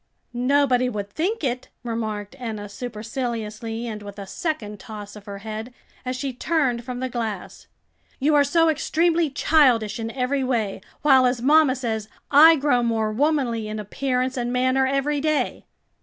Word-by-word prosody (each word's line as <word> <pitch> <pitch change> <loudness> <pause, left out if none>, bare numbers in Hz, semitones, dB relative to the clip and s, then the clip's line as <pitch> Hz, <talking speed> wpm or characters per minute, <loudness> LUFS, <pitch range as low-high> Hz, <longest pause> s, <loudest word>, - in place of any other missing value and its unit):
"Nobody 255 0 +2
would 205 -3 -5
think 365 - -2
it," 250 -1 -2
remarked 220 -1 -4
Enna 215 -4 -5
superciliously 225 0 -4
and 215 -3 -5
with 205 0 -9
a 200 - -6
second 210 - -4
toss 210 -1 -9
of 210 -1 -12
her 200 -1 -6
head, 220 +3 -6 0.3
as 255 0 -3
she 265 +1 -3
turned 255 -4 0
from 250 0 -5
the 260 - -1
glass; 225 -6 -5 0.5
"you 295 +3 +2
are 290 -1 +6
so 330 +4 +3
extremely 325 +1 +2
childish 260 -7 +3
in 225 0 -3
every 265 +2 -1
way, 230 -6 -1 0.2
while, 265 -3 +6
as 245 -1 -1
mamma 295 -1 +5
says, 220 -4 -3 0.2
I 315 +3 +9
grow 275 -4 +2
more 225 -2 0
womanly 245 -3 0
in 215 0 -4
appearance 255 +4 -2
and 240 0 -1
manner 255 +1 +2
every 275 +2 0
day." 310 0 0
250 Hz, 160 wpm, -23 LUFS, 220-280 Hz, 0.5 s, I